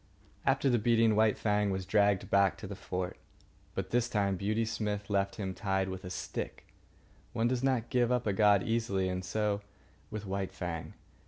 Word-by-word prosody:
After 135 +1 +3
the 120 -3 +3
beating, 115 0 +4
White 110 -1 +4
Fang 105 -1 +1
was 95 -1 -2
dragged 100 -1 +2
back 100 -1 +4
to - - -8
the 100 - -5
fort. 90 -1 -4 0.6
But - - -3
this 120 0 +2
time 100 -3 +1
Beauty 110 +4 0
Smith 105 -2 -3
left 100 -1 +1
him 95 -3 -3
tied 95 0 -1
with 95 0 -6
a 90 - -6
stick. 90 - -5 0.7
One 115 +1 +1
does 125 0 0
not 130 -4 0
give 125 -1 +3
up 125 -1 +1
a 105 - +1
god 100 -1 +5
easily, 110 -5 0
and 90 0 -3
so 105 +2 0 0.5
with 105 -1 -5
White 95 0 -3
Fang. 85 -3 -5
105 Hz, 185 wpm, -31 LUFS, 95-115 Hz, 0.7 s, god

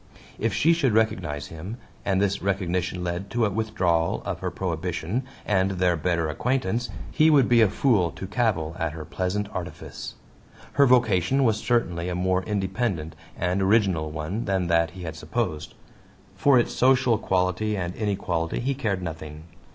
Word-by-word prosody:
If 115 - +1
she 160 - +3
should 140 -9 +1
recognize 90 -10 0
him, 90 +8 -7 0.3
and 95 -1 +1
this 100 0 +1
recognition 90 -2 -1
led 90 +3 -3
to 120 -1 +1
a 105 - 0
withdrawal 95 -6 0
of - - -3
her - - -2
prohibition, 90 +4 -2 0.2
and 95 -2 +2
their 90 -1 +2
better 85 0 0
acquaintance, 120 - -1 0.2
he 155 0 +4
would 140 -5 +5
be 120 -1 +5
a 110 - +5
fool 105 -5 +2
to - - -7
cavil 95 -7 0
at 80 -2 -1
her 80 -1 -7
pleasant 95 +3 -2
artifice. 90 -1 -6 0.6
Her 140 - +5
vocation 125 0 +3
was 110 -4 +3
certainly 90 -8 0
a 90 - -2
more 95 +1 +1
independent 95 -5 -2 0.2
and 90 +2 0
original 95 -6 +2
one 80 +9 -4
than 95 -2 0
that 85 0 +3
he 90 - -7
had 80 -2 -5
supposed; 80 -4 -3 0.6
for 140 -2 +4
its 120 - +1
social 130 -3 +3
quality 95 +2 0
and 90 -1 -3
inequality 90 -6 -1
he 135 +3 0
cared 105 -9 -2
nothing. 80 -2 -7
95 Hz, 165 wpm, -25 LUFS, 85-110 Hz, 0.6 s, would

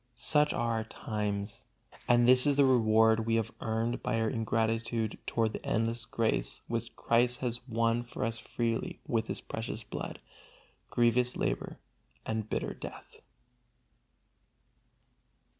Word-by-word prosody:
Such 150 +4 +3
are 115 -2 0
our 110 - -1
times, 105 -2 -3 0.4
and 120 0 +5
this 125 +2 +6
is 145 - +4
the 140 0 +5
reward 110 -2 +4
we 115 - +3
have 115 -2 0
earned 115 +1 -1
by 115 - 0
our 110 -1 +1
ingratitude 115 -1 0
toward 110 -2 +1
the - - -6
endless 115 +2 -1
grace 115 -2 0
which 115 0 -3
Christ 120 +1 +2
has 120 0 -3
won 115 0 +1
for 120 -2 -4
us 115 0 -2
freely 115 0 -2
with 115 -1 0
His - - -4
precious 110 0 -5
blood, - - -6 0.7
grievous 120 +1 +2
labor - - -2 0.5
and 110 -1 -2
bitter - - -2
death. - - -10
115 Hz, 135 wpm, -31 LUFS, 110-120 Hz, 0.7 s, this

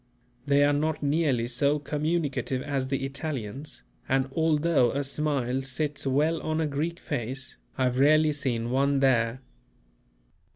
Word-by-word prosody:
They 140 0 +4
are 145 0 +4
not 150 +1 -1
nearly 140 -5 +1
so 140 +4 +1
communicative 150 -3 -1
as 140 -3 -2
the 135 0 -1
Italians, 135 - -5 0.3
and 135 0 +2
although 160 -4 +3
a 140 +4 -1
smile 135 -3 -1
sits 140 +2 -3
well 150 +5 +1
on 155 0 -1
a 160 - +1
Greek 155 +4 -2
face, 130 -1 -4 0.2
I 130 - +1
have 125 0 +1
rarely 155 +2 +5
seen 120 -5 -2
one 140 +1 +2
there. 125 -2 +2
140 Hz, 140 wpm, -27 LUFS, 130-150 Hz, 0.3 s, rarely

